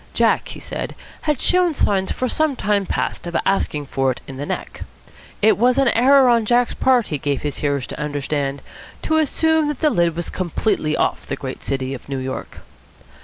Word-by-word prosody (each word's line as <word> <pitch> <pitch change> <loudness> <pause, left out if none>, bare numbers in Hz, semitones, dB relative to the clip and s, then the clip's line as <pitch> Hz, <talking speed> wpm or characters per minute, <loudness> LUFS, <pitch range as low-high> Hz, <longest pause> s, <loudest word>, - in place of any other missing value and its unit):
Jack, - - +2
he - - -8
said, - - -5 0.3
had 300 -4 0
shown 360 -3 +2
signs 190 -6 +1
for 255 - -1
some 310 +2 +1
time 205 -4 0
past - - -2
of 170 - -6
asking 155 -6 0
for 135 -1 0
it 130 - -2
in 135 - -8
the 145 +2 -5
neck. - - -5 0.6
It 215 -1 +5
was 250 +2 +3
an 275 -2 +4
error 265 +3 +5
on 235 -2 +4
Jack's 240 +2 +2
part, 255 -3 +2
he 150 - -2
gave 140 0 -2
his 145 -2 -3
hearers 140 -3 -1
to - - -8
understand, 145 -1 -2 0.4
to 315 - +1
assume 315 0 +2
that 295 -2 -3
the 305 - +3
lid 170 -5 +1
was 170 0 -4
completely 175 -3 -1
off - - -1
the - - -2
great 130 -2 -7
city 135 -1 -2
of 135 +1 -9
New 135 - -2
York. 130 0 -6
190 Hz, 200 wpm, -20 LUFS, -, 0.6 s, It